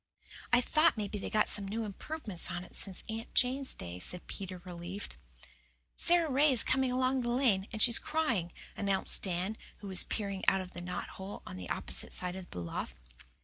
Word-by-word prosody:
"I 245 0 +6
thought 310 +2 +3
maybe 210 0 -3
they'd - - -4
got 215 0 +3
some 200 -1 +2
new 220 +3 -2
improvements 210 - -2
on 175 - -3
it - - -14
since 190 -2 0
Aunt 225 +1 -6
Jane's 260 +2 +4
day," 90 0 -7
said 180 - -3
Peter, 185 -2 -6
relieved. 180 +3 -6 0.8
"Sara 345 -1 +4
Ray 290 +1 +4
is 245 -3 +5
coming 260 -1 +1
along 255 +1 +2
the 240 - -2
lane, 240 -6 +2
and 220 -2 +3
she's 235 -2 +4
crying," 235 - 0 0.2
announced 195 -2 +4
Dan, 185 +3 -1 0.2
who 205 - -9
was 190 - +3
peering 200 -3 -3
out 195 - +5
of 185 -1 -7
a 175 - -5
knot 180 0 -4
hole 190 +2 -8
on - - -7
the 90 -1 -7
opposite - - -1
side 180 0 -2
of 190 -1 -8
the - - -9
loft. 85 -7 -4
205 Hz, 195 wpm, -32 LUFS, 185-250 Hz, 0.8 s, I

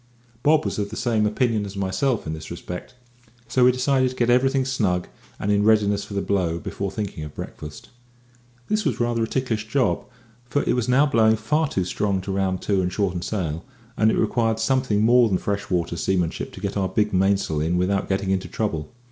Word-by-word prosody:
Bob 155 +2 +3
was - - -2
of 100 -1 -2
the 110 - -7
same 110 -3 +1
opinion 110 0 +1
as 100 0 -7
myself 100 +6 0
in 80 - -3
this 80 0 -8
respect, 90 +7 -7 0.5
so 125 +1 +2
we 125 - +7
decided 130 +1 +2
to 130 - -9
get 120 -1 +2
everything 135 +1 +3
snug 100 -9 0 0.3
and 100 - 0
in 100 0 +3
readiness 105 -2 +3
for 100 - -8
the 100 - 0
blow 90 -4 0
before 100 +3 -4
thinking 100 -6 -5
of 75 -1 -9
breakfast. 75 0 -8 0.8
This 215 0 0
was 130 - -1
rather 120 -1 0
a 115 - +1
ticklish 110 -4 -2
job, 130 +2 +1 0.5
for 145 +5 +1
it - - +1
was 125 0 -1
now 135 +4 +5
blowing 110 -5 +4
far 150 +9 0
too 95 -9 -1
strong 100 +1 -1
to 95 - -5
round 95 -1 -1
to 100 -2 +1
and 90 0 -1
shorten 95 -3 -1
sail, 85 -5 -3 0.3
and 110 - +3
it - - +1
required 115 0 +1
something 110 -2 +1
more 120 0 +5
than 95 - +2
freshwater 95 -4 -2
seamanship 90 -1 -1
to - - -9
get - - -3
our 95 -2 0
big 105 -2 0
mainsail 95 -5 +1
in 85 +3 0
without 95 +2 0
getting 95 0 0
into 95 -1 -1
trouble. 80 -8 -3
105 Hz, 205 wpm, -23 LUFS, 95-120 Hz, 0.8 s, we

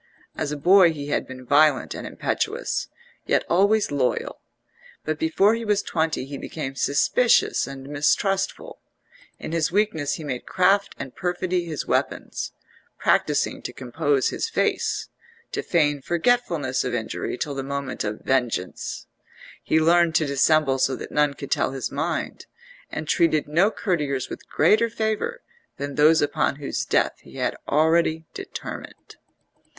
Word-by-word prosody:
As 150 -2 -2
a 150 - -3
boy 180 +3 +6
he 145 -1 -6
had - - -1
been 130 -1 -10
violent 145 +1 +3
and - - -6
impetuous, - - -2 0.4
yet - - +2
always 200 +3 +3
loyal: 135 -3 -1 0.6
but 155 0 -2
before 195 +6 +3
he 230 0 -2
was 210 -2 +1
twenty 160 -5 -1
he 140 0 -7
became 140 -4 -5
suspicious 145 - +2
and 135 0 -8
mistrustful; 190 +7 0 0.6
in - - -7
his 165 -2 0
weakness 165 -8 +1
he 160 - -8
made 130 -4 -5
craft 195 +2 +2
and 130 - -7
perfidy 180 0 -1
his 155 -4 -4
weapons, - - -2 0.5
practising - - +1
to - - -5
compose 135 +2 0
his - - -3
face, - - 0 0.4
to - - -2
feign 145 -4 +1
forgetfulness 170 - +1
of 125 -1 -2
injury 115 +1 -3
till 145 - -3
the 135 - -3
moment 140 0 -4
of 105 0 -4
vengeance; 120 -8 -2 0.6
he 160 - +2
learned 170 0 +4
to 155 - +3
dissemble 140 0 +3
so 130 0 +2
that - - -8
none 150 -1 +2
could 140 +2 -8
tell - - +1
his 135 - -4
mind, - - -3 0.4
and 155 - -5
treated 155 -2 +2
no 170 +7 +3
courtiers 150 - -2
with - - -9
greater 215 +9 +3
favour 225 - -2 0.3
than 140 0 -4
those 155 +2 +5
upon 145 -1 0
whose 140 -1 -3
death - - +1
he - - -16
had - - -1
already 160 +1 +2
determined. 390 0 -8
155 Hz, 150 wpm, -24 LUFS, 140-180 Hz, 0.6 s, boy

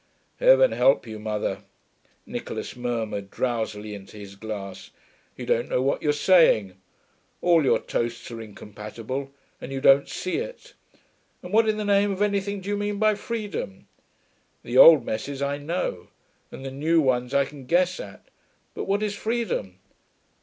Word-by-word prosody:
'Heaven - - +6
help 135 - +3
you, 110 -2 -7
mother,' 105 -2 -3 0.6
Nicholas - - -6
murmured 115 -5 -3
drowsily 110 -4 -3
into 100 +1 -11
his 100 -1 -10
glass. 100 -2 -7 0.5
'You - - -6
don't 120 - 0
know - - +1
what 135 - 0
you're 150 - +2
saying. 145 - +4 0.7
All 170 -3 +4
your 135 - +4
toasts 120 +1 -3
are 115 -1 -6
incompatible, 110 +5 -7 0.3
and 135 - -7
you 135 - -3
don't 135 +1 +5
see 185 - -3
it. - - -7 0.7
And 180 - -9
what 220 0 +4
in 215 - 0
the 210 - -3
name 200 0 +3
of 195 +1 0
anything 200 -1 -1
do 190 - -7
you 205 - 0
mean 205 0 -2
by 215 +1 +3
Freedom? 210 - -5 0.8
The 120 - -5
old 145 -1 +9
messes 135 +6 -4
I 140 +1 -1
know, 145 - -3 0.4
and 135 - -9
the 135 - -5
new 155 +5 +2
ones 125 -4 +1
I 140 0 +4
can 135 -2 -12
guess 180 +3 +2
at - - -10 0.5
but - - -5
what 200 +2 0
is 210 -1 -1
Freedom? 215 - -2
140 Hz, 160 wpm, -25 LUFS, -, 0.8 s, old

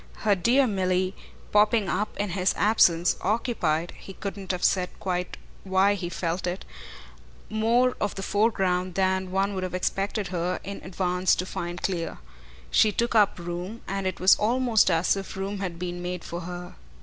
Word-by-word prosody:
Her 210 - +5
dear 240 +9 +3
Milly, 185 -3 0 0.4
popping 210 0 +4
up 210 +2 -2
in 205 0 -1
his 185 +1 +1
absence, 180 -4 +4
occupied 180 -7 0
he 195 - -10
couldn't 195 -1 -5
have 180 -1 -4
said 180 -2 +2
quite 180 -1 -3 0.3
why 190 +1 +3
he 180 -3 -4
felt 175 +1 -2
it 180 +2 -4 0.9
more 235 +4 +2
of 205 - -1
the 195 - -5
foreground 185 -4 +1
than 190 0 +1
one 195 +2 0
would 190 - -3
have 185 -1 -3
expected 195 +2 -1
her 180 0 -1
in 200 +2 -6
advance 180 0 +1
to 180 - -2
find 175 -1 -5
clear. 175 -4 -2 0.5
She 215 - +5
took 235 +3 0
up 210 -3 +4
room, 175 +6 -5
and 195 0 -2
it 185 - -3
was 185 +1 +7
almost 235 -1 +3
as 165 +2 +2
if 195 -1 -6
room 195 +1 -3
had 180 -3 -4
been 175 0 -4
made 180 -1 -4
for 170 - -5
her. 175 +1 -7
190 Hz, 175 wpm, -26 LUFS, 180-205 Hz, 0.9 s, was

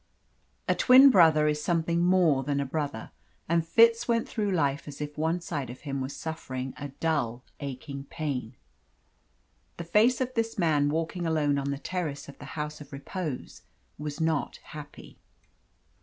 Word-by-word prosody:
A - - +4
twin 265 +2 +7
brother 160 -6 +5
is 150 0 0
something 170 0 +1
more 175 -6 +4
than 140 +1 -1
a 140 - 0
brother, 140 -5 -4 0.4
and 170 0 +2
Fitz 230 +7 +4
went 230 -1 +1
through 210 -3 -2
life 145 -7 0
as 145 - -8
if 150 0 -5
one 160 +3 0
side 145 -7 -4
of 125 - -9
him 140 -2 -4
was 130 +1 -4
suffering 130 -5 -5
a 145 0 -6
dull, 135 -5 -2 0.2
aching 140 0 -6
pain. 135 -6 -4 1.2
The 170 - -5
face 220 +8 +3
of 255 -1 -2
this 225 -1 -1
man 150 -5 +2
walking 165 +3 -2
alone 150 -3 +1
on 140 0 -2
the 140 - -2
terrace 155 -2 -4
of 140 - -12
the - - -9
House 150 0 -4
of 145 - -12
Repose 145 +1 -6 0.4
was 150 0 -5
not 160 -2 0
happy. 150 -1 -11
150 Hz, 165 wpm, -28 LUFS, 140-170 Hz, 1.2 s, twin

